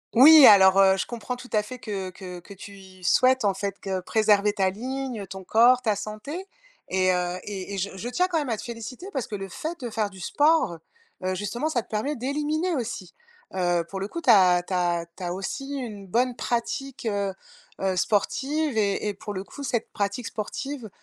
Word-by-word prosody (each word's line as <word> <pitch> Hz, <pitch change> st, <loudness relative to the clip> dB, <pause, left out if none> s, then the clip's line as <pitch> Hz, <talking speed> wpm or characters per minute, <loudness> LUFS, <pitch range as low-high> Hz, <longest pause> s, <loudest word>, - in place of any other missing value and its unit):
Oui. 295 Hz, +4 st, +10 dB
Alors, 190 Hz, -2 st, +8 dB
heu, 190 Hz, -1 st, +6 dB
je -, -, -1 dB
comprends, 240 Hz, +1 st, -5 dB
tout 250 Hz, 0 st, -12 dB
à 215 Hz, -, +3 dB
fait, 250 Hz, +4 st, -9 dB
que 195 Hz, -4 st, -4 dB
que 180 Hz, -1 st, -9 dB
que 185 Hz, +3 st, -13 dB
tu 200 Hz, +1 st, -11 dB
y 185 Hz, -1 st, -15 dB
souhaites, 255 Hz, +5 st, +4 dB
en 200 Hz, -1 st, +3 dB
fait, 195 Hz, 0 st, -3 dB
heu, 190 Hz, -1 st, -1 dB
préserver 210 Hz, +1 st, +3 dB
ta 195 Hz, -3 st, +2 dB
ligne, 255 Hz, +3 st, -4 dB
heu, 195 Hz, -, -8 dB
ton 190 Hz, 0 st, -8 dB
corps, 245 Hz, +5 st, +5 dB
ta 215 Hz, -3 st, +1 dB
santé. 285 Hz, -, -6 dB, 0.4 s
Et 185 Hz, 0 st, +2 dB
heu, 180 Hz, 0 st, -1 dB
et 200 Hz, -1 st, -6 dB
et -, -, -3 dB
je 195 Hz, +1 st, -1 dB
je 225 Hz, -, -5 dB
tiens 360 Hz, +9 st, +1 dB
quand 335 Hz, -, 0 dB
même 290 Hz, -3 st, -1 dB
à 225 Hz, -, +1 dB
te -, -, -7 dB
féliciter 240 Hz, -, -7 dB
parce 265 Hz, -4 st, -3 dB
que 210 Hz, -, -5 dB
le 195 Hz, -1 st, -6 dB
fait 320 Hz, -, -5 dB
de 245 Hz, -, -4 dB
faire 215 Hz, -2 st, -1 dB
du 190 Hz, -2 st, -13 dB
sport, 295 Hz, -, +2 dB, 0.5 s
heu, 185 Hz, 0 st, 0 dB
justement 220 Hz, +9 st, -2 dB
ça 250 Hz, -7 st, 0 dB
te -, -, -30 dB
permet 225 Hz, +8 st, -1 dB
d'éliminer 300 Hz, +7 st, -1 dB
aussi. 225 Hz, -, -5 dB, 0.4 s
Heu, 175 Hz, -2 st, +1 dB
pour 195 Hz, -, -5 dB
le 195 Hz, -, -3 dB
coup, 335 Hz, +10 st, -6 dB
tu 265 Hz, -, -1 dB
as 180 Hz, -4 st, +6 dB
tu 185 Hz, -, -6 dB
as 175 Hz, -1 st, +1 dB
tu 185 Hz, -, -8 dB
as 175 Hz, -, -2 dB
aussi 270 Hz, +9 st, -5 dB
une 215 Hz, -7 st, -6 dB
bonne 245 Hz, +5 st, +1 dB
pratique, 260 Hz, +2 st, -3 dB
heu 200 Hz, -2 st, -1 dB, 0.5 s
heu, 190 Hz, -1 st, +1 dB
sportive 275 Hz, -, 0 dB
et 205 Hz, 0 st, +1 dB
et -, -, -2 dB
pour 205 Hz, +1 st, -7 dB
le 190 Hz, 0 st, -4 dB
coup, 285 Hz, -, -10 dB
cette 240 Hz, -4 st, -2 dB
pratique 200 Hz, +3 st, -2 dB
sportive, 245 Hz, +3 st, -5 dB
210 Hz, 220 wpm, -25 LUFS, 190-255 Hz, 0.5 s, Oui